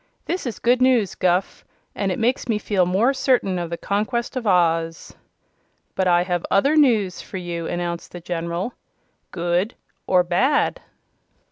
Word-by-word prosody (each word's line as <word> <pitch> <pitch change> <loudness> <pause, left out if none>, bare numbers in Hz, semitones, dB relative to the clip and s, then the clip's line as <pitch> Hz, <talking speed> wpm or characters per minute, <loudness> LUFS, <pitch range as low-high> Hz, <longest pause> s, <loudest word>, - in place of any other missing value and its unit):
"This 355 -5 -3
is 235 - -4
good 245 +1 +2
news, 250 -6 +3
Guph, 180 +1 0 0.3
and 195 -2 -1
it 180 - -2
makes 245 +3 0
me 220 - +2
feel 195 -4 +1
more 210 +9 +2
certain 250 -9 +1
of 170 -1 -4
the 170 - -4
conquest 220 +7 -2
of 245 -4 -3
Oz." 165 -3 +1 0.8
"But 190 - 0
I 175 0 +4
have 180 -2 -2
other 275 +10 +3
news 225 - +3
for 190 - -8
you," 170 -2 -4
announced 175 -1 -4
the 175 - -8
General. 170 +5 -3 0.6
"Good 175 +5 -1 0.3
or 180 -1 +4
bad?" 215 +12 +1
185 Hz, 155 wpm, -22 LUFS, 175-235 Hz, 0.8 s, I